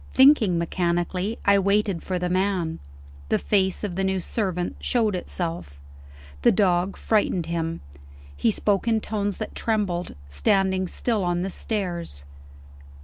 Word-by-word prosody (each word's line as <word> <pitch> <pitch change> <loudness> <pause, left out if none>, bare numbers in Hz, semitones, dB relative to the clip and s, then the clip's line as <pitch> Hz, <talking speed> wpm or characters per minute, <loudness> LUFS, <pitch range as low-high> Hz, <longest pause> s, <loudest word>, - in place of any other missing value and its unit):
Thinking 260 - +6
mechanically, 175 +4 -1
I 200 0 +5
waited 200 -2 +1
for 185 - -2
the 180 0 -1
man. 185 -3 0 0.5
The - - +3
face 190 -2 +1
of 195 -4 -3
the 195 - -1
new 190 0 +1
servant 180 -2 -2
showed 225 -4 +1
itself. 165 - -4 0.6
The - - +5
dog 185 -1 +2
frightened 200 -5 +1
him: 165 0 -3 0.5
he - - +2
spoke 205 0 +1
in 225 -1 +3
tones 205 -2 -2
that 215 - -5
trembled, 200 -6 -1
standing 190 - +1
still 220 +1 -1
on 175 0 0
the 190 - -3
stairs. 175 - -3
190 Hz, 140 wpm, -24 LUFS, 175-205 Hz, 0.6 s, Thinking